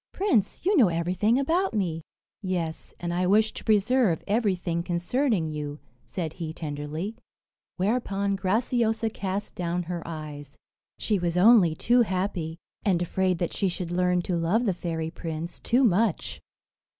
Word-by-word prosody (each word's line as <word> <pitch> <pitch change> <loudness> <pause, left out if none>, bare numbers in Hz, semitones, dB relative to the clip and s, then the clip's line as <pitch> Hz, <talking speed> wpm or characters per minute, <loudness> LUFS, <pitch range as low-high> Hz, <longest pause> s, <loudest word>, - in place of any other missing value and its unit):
"Prince, 325 - 0
you 400 +3 +4
know 240 -8 +7
everything 180 +7 +1
about 330 - +1
me." 170 -6 -1 0.4
"Yes; 175 -5 -3
and 175 0 -3
I 180 +1 +1
wish 215 +3 +4
to - - -7
preserve 215 -3 +2
everything 190 -6 0
concerning 175 - 0
you," 150 -1 -4 0.3
said 165 -4 -4
he 165 -3 -5
tenderly; 155 +6 -4 0.6
whereupon 200 -1 0
Graciosa 225 +3 +1
cast 200 0 -4
down 175 0 -2
her 175 0 -4
eyes. 150 -3 -8 0.4
She 210 -3 0
was 175 0 -1
only 190 -5 +6
too 240 +8 +3
happy, 185 -5 -1 0.3
and 185 -4 +2
afraid 185 +1 0
that 170 0 -2
she 195 - 0
should 175 -1 -4
learn 180 0 +2
to 180 - -1
love 175 +9 +1
the 200 - +2
fairy 165 -2 -3
prince 165 -1 -5
too 245 +3 +2
much. 215 -3 +1
185 Hz, 150 wpm, -26 LUFS, 170-215 Hz, 0.6 s, know